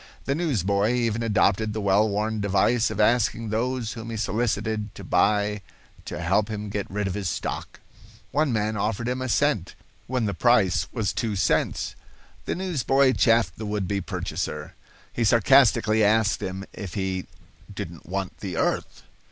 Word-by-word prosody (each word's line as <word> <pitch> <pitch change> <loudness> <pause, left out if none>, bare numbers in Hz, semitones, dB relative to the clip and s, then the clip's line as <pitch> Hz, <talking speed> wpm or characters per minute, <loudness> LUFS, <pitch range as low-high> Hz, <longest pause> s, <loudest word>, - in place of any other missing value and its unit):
The 135 - +1
newsboy 110 - +1
even 115 -2 0
adopted 110 -1 +2
the 110 - -3
well 100 +1 +3
worn 105 +2 -1
device 100 +4 +2
of - - -5
asking 115 0 +2
those 115 +1 -1
whom 115 -1 -7
he 115 - -4
solicited 110 0 -1
to - - -9
buy 105 0 +2 0.4
to - - -5
help 105 -1 +1
him 105 -1 -4
get 100 -1 -3
rid 105 +1 -2
of 95 - -2
his 100 -2 -2
stock. - - -4 0.5
One 150 0 +1
man 110 -1 0
offered 110 +3 -1
him 125 +1 -2
a 130 - -2
cent, - - +1 0.3
when 125 -2 0
the 100 - -1
price 105 -2 +3
was 110 -6 -1
two 110 -4 -2
cents. 95 - 0 0.5
The - - -2
newsboy 140 -7 +2
chaffed 115 -9 +3
the 110 - -4
would 105 -2 -2
be 100 0 -1
purchaser. - - -4 0.4
He 120 - 0
sarcastically 115 -1 +4
asked 105 0 +3
him 95 +1 -4
if 95 -5 -7
he 95 -2 -2 0.4
"didn't - - -7
want 95 +1 -4
the 90 -5 -5
earth." - - -1
110 Hz, 165 wpm, -25 LUFS, 100-115 Hz, 0.5 s, sarcastically